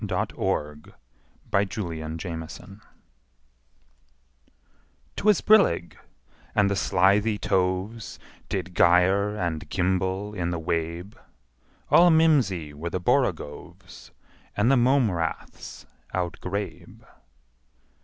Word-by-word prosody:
Lewis - - -1
Carroll 75 0 -2 0.8
Jabberwocky 85 -1 -4 2.4
'TWAS 210 -2 +3
brillig, 140 - +3 0.6
and 100 -1 +3
the - - +1
slithy 100 +4 +2
toves 95 +4 -2 0.3
Did 95 -2 -4
gyre 95 +5 +3
and 85 -5 -3
gimble 95 +2 -1
in 90 -4 -2
the 85 - -2
wabe: 85 +3 -3 0.8
All 175 +1 +7
mimsy 135 - +2
were 80 +4 -5
the 95 - -3
borogoves, 75 -4 -2 0.5
And 110 +5 +3
the - - +5
mome 125 -2 +3
raths 85 -2 -5 0.3
outgrabe. 95 +3 -5
95 Hz, 85 wpm, -25 LUFS, 85-105 Hz, 2.4 s, All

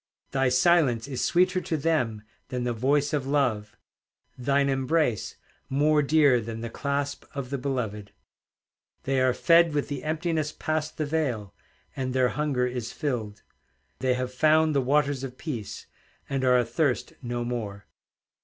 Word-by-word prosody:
Thy 135 -1 +2
silence 130 -3 +3
is 130 -3 -3
sweeter 185 +1 +2
to 160 - -2
them 130 -9 0 0.2
than 125 -2 -3
the 120 0 -1
voice 140 +5 +1
of 140 -3 -1
love, 125 -7 0 0.6
Thine 140 +2 +1
embrace 135 - 0 0.3
more 150 +2 +3
dear 145 -4 +4
than 115 +1 -6
the 115 -1 -5
clasp 140 +1 -2
of 135 -2 -5
the 140 - -2
beloved. 110 -7 -3 0.9
They 135 -1 +1
are 130 0 +4
fed 170 -2 +4
with 145 - -1
the 145 - -4
emptiness 155 -1 -1
past 155 0 -3
the 155 - -1
veil, 135 -10 -2 0.4
And 130 -1 -3
their 130 -1 +3
hunger 135 0 0
is 125 -2 -4
filled; 115 -8 -4 0.6
They 130 -1 +1
have 125 0 -3
found 155 +3 +4
the 140 - +2
waters 140 0 +1
of 130 -1 -6
peace, 120 -11 -6 0.4
And 135 -1 -2
are 125 -1 +5
athirst 125 +3 0
no 120 -1 -3
more. 105 -5 -4
135 Hz, 155 wpm, -26 LUFS, 125-150 Hz, 0.9 s, are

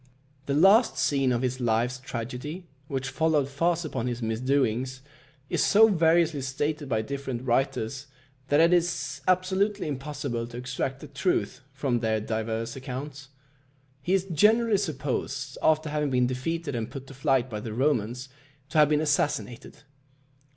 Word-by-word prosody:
The 140 - 0
last 195 - +5
scene 135 -3 +2
of 120 +1 0
his 130 0 -1
life's 120 +1 0
tragedy, 130 +8 -6 0.2
which 130 -2 -3
followed 155 -4 +2
fast 165 +4 0
upon 130 -5 -3
his 120 -1 -3
misdoings, 130 +2 0 0.5
is - - +1
so 220 +2 +6
variously 165 -4 +3
stated 145 +2 -2
by 110 -3 0
different 135 -1 -4
writers, 130 +1 -1 0.4
that 145 +2 +3
it 165 +2 +5
is 170 -6 0
absolutely 190 +2 +1
impossible 135 -4 -4
to 120 0 -9
extract 130 +2 -3
the 150 - -8
truth 140 -1 -1
from 135 -3 -1
their 110 -1 0
divers 110 +1 -3
accounts. 135 +1 -7 0.7
He 180 +7 +1
is 190 -1 0
generally 210 +5 +3
supposed, 140 -6 -3
after 155 0 +2
having 150 -1 0
been 125 -1 +2
defeated 145 +5 -3
and 115 -1 -3
put 135 +1 -8
to 135 - -12
flight 135 -2 +1
by 110 -4 -5
the 110 +1 -6
Romans, 125 0 0 0.4
to 155 - +2
have 150 -1 +6
been 150 0 +2
assassinated. 145 -5 -1
135 Hz, 150 wpm, -27 LUFS, 125-155 Hz, 0.7 s, so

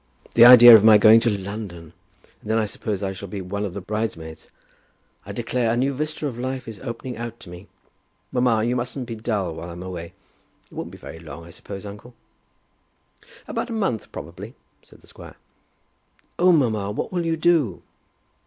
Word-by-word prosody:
The 115 - +8
idea 120 -1 +11
of 110 -2 +8
my 110 -1 +8
going 110 +2 +7
to 115 - +1
London! 100 -5 -6 0.5
And - - -11
then 110 - +2
I 110 - +1
suppose 105 -1 -4
I 95 -1 -2
shall 100 +1 -9
be 100 +2 -6
one 100 +2 -4
of 95 -4 -5
the 100 - -5
bridesmaids. 90 -7 -5 0.8
I - - -6
declare 120 -3 -1
a 120 - 0
new 135 +3 0
vista 155 +2 -4
of 125 -5 -4
life 130 0 -4
is 110 -3 -8
opening 125 0 -7
out 120 0 -7
to 85 - -12
me! 90 +3 -11 0.6
Mamma, 125 -4 +1
you 120 +2 0
mustn't 125 +1 -3
be 115 - -6
dull 105 -6 -3
while 85 +2 -8
I'm 85 +1 -8
away. 90 -2 -7 0.5
It - - -23
won't - - -6
be - - -12
very 80 - -10
long, 80 0 -10
I 85 - -13
suppose, 100 +3 -9
uncle?" 105 +4 -11 1.3
"About - - -4
a - - -4
month, 195 - -2
probably," 95 - -9 0.3
said - - -21
the - - -22
squire. - - -13 1.0
"Oh, 180 +1 +5
mamma; 110 - +1
what 105 - -4
will 175 -1 -1
you 165 0 0
do?" 155 - +1
110 Hz, 190 wpm, -22 LUFS, 95-125 Hz, 1.3 s, idea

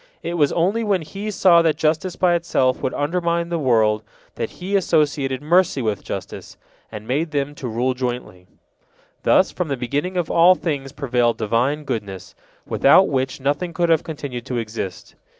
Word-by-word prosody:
It 170 - -3
was 150 -5 +2
only 195 +7 +1
when 195 -5 0
He 200 +7 -6
saw 180 -4 +5
that 160 -2 +2
justice 160 +3 0
by 180 -2 +2
itself 165 -7 +1
would 130 - -2
undermine 170 +2 -1
the 170 -1 -1
world 110 -6 +2 0.3
that - - -4
He 190 +3 -4
associated 145 -7 +1
mercy 175 -1 +3
with 110 -5 -2
justice, - - -7 0.3
and 110 0 -8
made 150 +6 0
them 145 -1 -2
to 135 -3 -6
rule 120 +3 0
jointly. 125 -8 -5 0.7
Thus, - - +3
from 180 - -3
the 140 -2 -2
beginning 145 +9 -2
of 175 -2 -1
all 175 +2 +6
things 140 -6 -3
prevailed 125 -4 0
Divine 125 +8 0
goodness, 100 -9 -5 0.3
without 185 +8 +4
which 130 -1 -1
nothing 145 +6 -1
could 170 0 0
have 160 -2 +3
continued 140 -6 -6
to 125 - -3
exist. 110 -5 -5
145 Hz, 170 wpm, -21 LUFS, 125-170 Hz, 0.7 s, all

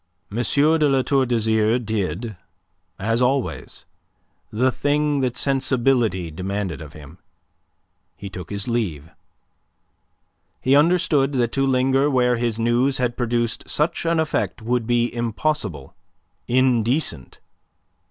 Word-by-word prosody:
de 140 +8 +2
La 135 -1 +2
Tour 135 -1 +1
d'Azyr 110 -1 +2
did, 110 -1 -3 0.6
as 115 +4 0
always, 130 +1 -2 0.7
the 125 +4 +2
thing 145 +1 0
that 125 -2 -1
sensibility 125 - +1
demanded 95 0 -4
of 75 -1 -10
him. 75 +3 -13 1.0
He 100 - -8
took 90 -2 -8
his 100 -1 -3
leave. 90 - -2 1.5
He 130 +2 +3
understood 150 -3 +3
that 120 -3 0
to 135 0 0
linger 135 +2 +2
where 125 -3 +2
his 115 -2 -1
news 120 +4 +1
had 125 -2 -1
produced 120 -1 -2
such 155 +3 0
an 165 0 +2
effect 155 -5 -1
would 120 0 -1
be 120 0 +1
impossible, 115 - -2 0.5
indecent. 125 - 0
120 Hz, 115 wpm, -22 LUFS, 110-135 Hz, 1.5 s, He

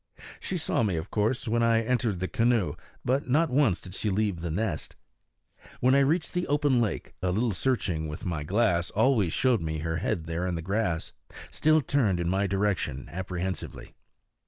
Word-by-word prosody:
She 185 - -3
saw 160 -6 0
me, 100 -6 +1
of 80 +4 -5
course, 110 +4 0
when 115 +1 +1
I 115 -1 +3
entered 115 -5 0
the 95 - 0
canoe, 115 -3 +1 0.3
but 130 +1 0
not 155 +3 +3
once 130 -9 +3
did 90 - -10
she 105 - -1
leave 100 -3 0
the 85 - -3
nest. 105 +8 -2 0.8
When 130 +1 +4
I 140 - +6
reached 160 +5 +1
the 180 0 -1
open 145 -3 +2
lake, 110 -6 -2
a 90 0 0
little 110 +5 +1
searching 90 -8 -1
with 75 +1 -7
my 85 -5 -2
glass 90 0 +1
always 110 -5 +2
showed 125 +2 +2
me 80 -1 -2
her 80 +1 -2
head 80 0 -2
there 85 +2 -2
in 90 - -1
the 80 - -4
grass, 95 -3 -1 0.4
still 155 0 +3
turned 115 -11 +1
in 85 0 0
my 100 +2 +1
direction 95 -9 -1
apprehensively. 95 0 -5
105 Hz, 185 wpm, -28 LUFS, 85-125 Hz, 0.8 s, I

